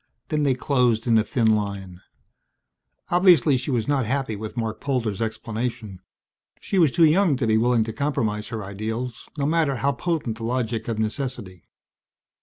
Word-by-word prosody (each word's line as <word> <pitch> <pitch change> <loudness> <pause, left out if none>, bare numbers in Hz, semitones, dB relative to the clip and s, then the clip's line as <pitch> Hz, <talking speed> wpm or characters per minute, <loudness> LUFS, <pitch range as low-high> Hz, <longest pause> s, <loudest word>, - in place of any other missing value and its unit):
Then 155 -1 0
they 140 -3 +2
closed 125 -4 +1
in 115 -2 +4
a - - +2
thin 110 -1 +2
line. 100 -3 -4 1.1
Obviously 175 -6 +5
she 130 +3 -3
was 120 -5 0
not 135 -5 +1
happy 135 -3 -1
with 110 +3 -7
Marc 110 -2 -3
Polder's 115 -7 -1
explanation. 110 -2 -4 0.6
She 195 - -1
was 165 -4 +5
too 170 +2 +5
young 165 0 +4
to 125 - -1
be 110 -1 +2
willing 120 -1 +3
to 110 0 -5
compromise 110 -7 -1
her 110 -2 -5
ideals, 110 +5 -5
no 140 - 0
matter 155 -2 +1
how 140 +3 +1
potent 140 -4 -2
the - - -6
logic 115 -2 -2
of 115 -2 -2
necessity. 110 -5 -4
120 Hz, 170 wpm, -24 LUFS, 110-140 Hz, 1.1 s, Obviously